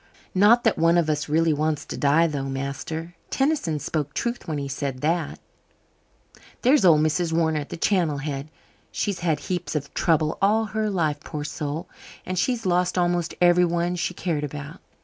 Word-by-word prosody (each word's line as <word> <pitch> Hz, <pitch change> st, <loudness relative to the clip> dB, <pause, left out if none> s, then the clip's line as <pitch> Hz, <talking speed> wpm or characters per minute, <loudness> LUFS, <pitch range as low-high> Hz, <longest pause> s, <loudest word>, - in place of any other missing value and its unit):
Not 210 Hz, +6 st, +5 dB
that 225 Hz, -, +2 dB
one 165 Hz, +1 st, +4 dB
of 160 Hz, -3 st, +2 dB
us 150 Hz, 0 st, -2 dB
really 160 Hz, +1 st, +3 dB
wants 150 Hz, 0 st, -1 dB
to -, -, -6 dB
die, 150 Hz, +4 st, +3 dB
though, 140 Hz, -4 st, -2 dB
master. 150 Hz, +5 st, -4 dB, 0.2 s
Tennyson 270 Hz, -, 0 dB
spoke 145 Hz, 0 st, -3 dB
truth 240 Hz, -2 st, -3 dB
when 155 Hz, -2 st, -2 dB
he 140 Hz, -1 st, -3 dB
said 135 Hz, -1 st, -4 dB
that. 160 Hz, 0 st, 0 dB, 1.3 s
There's 255 Hz, -1 st, +5 dB
old 160 Hz, -5 st, +6 dB
Mrs. 160 Hz, +2 st, +1 dB
Warner 160 Hz, -1 st, +1 dB
at 145 Hz, -, -7 dB
the -, -, -6 dB
Channel 170 Hz, -5 st, +1 dB
Head. 145 Hz, 0 st, -4 dB, 0.4 s
She's 200 Hz, -4 st, -2 dB
had 160 Hz, -4 st, 0 dB
heaps 175 Hz, 0 st, -3 dB
of 145 Hz, -2 st, -3 dB
trouble 160 Hz, -2 st, +1 dB
all 215 Hz, +3 st, +3 dB
her 215 Hz, 0 st, -2 dB
life, 160 Hz, -7 st, 0 dB
poor 150 Hz, -1 st, -6 dB
soul, 155 Hz, +2 st, -4 dB, 0.4 s
and 185 Hz, -1 st, -2 dB
she's 240 Hz, +1 st, 0 dB
lost 180 Hz, 0 st, +1 dB
almost 175 Hz, -2 st, 0 dB
everyone 175 Hz, 0 st, +3 dB
she 180 Hz, +1 st, -2 dB
cared 160 Hz, -6 st, -2 dB
about. 145 Hz, +3 st, -7 dB
165 Hz, 175 wpm, -24 LUFS, 150-180 Hz, 1.3 s, old